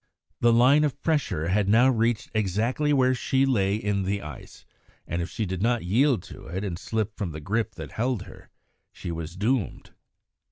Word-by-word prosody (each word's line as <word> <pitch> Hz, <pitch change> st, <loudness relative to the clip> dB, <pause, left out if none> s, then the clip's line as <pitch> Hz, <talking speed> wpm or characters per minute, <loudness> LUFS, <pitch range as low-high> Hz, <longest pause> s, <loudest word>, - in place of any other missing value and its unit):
The 120 Hz, -, +4 dB
line 130 Hz, +6 st, +5 dB
of 145 Hz, -3 st, -1 dB
pressure 100 Hz, -, 0 dB
had 100 Hz, +1 st, +1 dB
now 120 Hz, +5 st, +6 dB
reached 115 Hz, -2 st, +1 dB
exactly 110 Hz, +8 st, 0 dB
where 130 Hz, -2 st, +4 dB
she 130 Hz, +2 st, +1 dB
lay 100 Hz, -7 st, +2 dB
in 105 Hz, -2 st, -1 dB
the 100 Hz, +1 st, -2 dB
ice, 75 Hz, -, -10 dB, 0.4 s
and 85 Hz, +1 st, -2 dB
if 85 Hz, -, -4 dB
she 110 Hz, -, -3 dB
did 95 Hz, -1 st, -4 dB
not 120 Hz, +1 st, +1 dB
yield 120 Hz, -, +2 dB
to -, -, -11 dB
it 95 Hz, +4 st, -4 dB
and 90 Hz, -4 st, -4 dB
slip 110 Hz, 0 st, -2 dB
from 95 Hz, -7 st, -4 dB
the 80 Hz, -, -6 dB
grip 110 Hz, +7 st, -2 dB
that -, -, -8 dB
held 120 Hz, -3 st, -1 dB
her, 90 Hz, -, -14 dB, 0.4 s
she 85 Hz, -, -6 dB
was 80 Hz, 0 st, -6 dB
doomed. 110 Hz, +2 st, -1 dB
110 Hz, 190 wpm, -26 LUFS, 95-125 Hz, 0.4 s, now